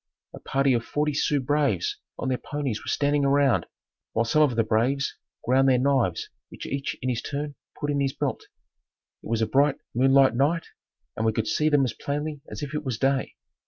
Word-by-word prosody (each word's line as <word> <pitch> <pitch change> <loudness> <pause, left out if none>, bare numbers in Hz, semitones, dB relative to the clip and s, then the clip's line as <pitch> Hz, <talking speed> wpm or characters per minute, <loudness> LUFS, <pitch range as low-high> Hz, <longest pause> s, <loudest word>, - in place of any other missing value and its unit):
A - - -9
party 135 -1 +1
of 115 -1 0
forty 150 +3 -1
Sioux 145 0 +1
braves 150 - 0 0.2
on - - -3
their 125 - 0
ponies 140 -7 -3
were - - -12
standing 145 0 +1
around, 140 -2 +3 0.5
while 115 +1 +1
some 155 +7 +3
of 140 -6 +3
the 115 - +3
braves 125 +6 0 0.3
ground 135 +2 +4
their 130 - +4
knives 130 -9 +1 0.2
which - - -9
each 140 0 -3
in 130 - 0
his 120 -2 -1
turn 145 0 -4 0.3
put 145 0 -1
in 140 -1 0
his 135 -1 +1
belt. - - -3 0.7
It - - -10
was 115 -1 +1
a - - +3
bright 140 +4 +3 0.2
moonlight 135 +1 +5
night 150 +7 +1 0.5
and 110 - -2
we 110 - +3
could - - -1
see 155 -1 +1
them 145 -3 +4
as 125 - -2
plainly 145 0 -4
as - - -6
if 145 +1 -5
it 150 0 -2
was 130 -5 -2
day. 135 +1 0
140 Hz, 205 wpm, -26 LUFS, 125-145 Hz, 0.7 s, moonlight